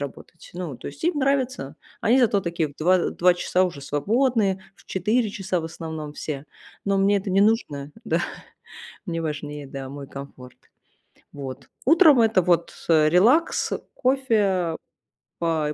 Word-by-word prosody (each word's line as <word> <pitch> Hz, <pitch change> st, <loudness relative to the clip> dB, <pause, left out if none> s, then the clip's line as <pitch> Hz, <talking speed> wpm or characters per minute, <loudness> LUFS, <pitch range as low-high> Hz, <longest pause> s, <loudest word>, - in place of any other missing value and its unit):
работать. 145 Hz, +4 st, -9 dB
Ну, 170 Hz, -8 st, -5 dB
то -, -, -9 dB
есть 145 Hz, -, -8 dB
им 340 Hz, -4 st, +1 dB
нравится. 260 Hz, -, 0 dB, 0.2 s
Они 245 Hz, +5 st, +4 dB
зато 220 Hz, -5 st, +3 dB
такие 170 Hz, -3 st, -2 dB
в -, -, -19 dB
2, 180 Hz, +4 st, +4 dB
э, 175 Hz, -, 0 dB
в -, -, -11 dB
2 180 Hz, 0 st, +5 dB
часа 180 Hz, +1 st, +1 dB
уже 160 Hz, -6 st, -5 dB
свободные, 200 Hz, -, +1 dB
в -, -, -22 dB
4 195 Hz, -2 st, 0 dB
в 160 Hz, -, -7 dB
основном 160 Hz, -2 st, -7 dB
все. 145 Hz, -1 st, -5 dB, 0.4 s
Но 200 Hz, 0 st, +2 dB
мне 200 Hz, +1 st, +3 dB
это 195 Hz, -, -6 dB
не 195 Hz, +2 st, +4 dB
нужно, 150 Hz, -, 0 dB
да. -, -, +1 dB, 0.9 s
Мне 165 Hz, -1 st, -2 dB
важнее, 150 Hz, -2 st, -5 dB
да, 135 Hz, -1 st, -6 dB
мой 140 Hz, 0 st, -8 dB
комфорт. 135 Hz, -2 st, -10 dB, 0.8 s
Вот. 135 Hz, -2 st, -8 dB, 0.2 s
Утром- 310 Hz, -2 st, +6 dB
это 220 Hz, -5 st, +4 dB
вот, 170 Hz, -1 st, +1 dB, 0.2 s
э, 155 Hz, -2 st, +5 dB
релакс, 230 Hz, -, +3 dB, 0.2 s
кофе, 260 Hz, -3 st, +1 dB
а, 185 Hz, -5 st, +1 dB, 0.9 s
и 150 Hz, -, -3 dB
180 Hz, 160 wpm, -24 LUFS, 150-220 Hz, 0.9 s, Утром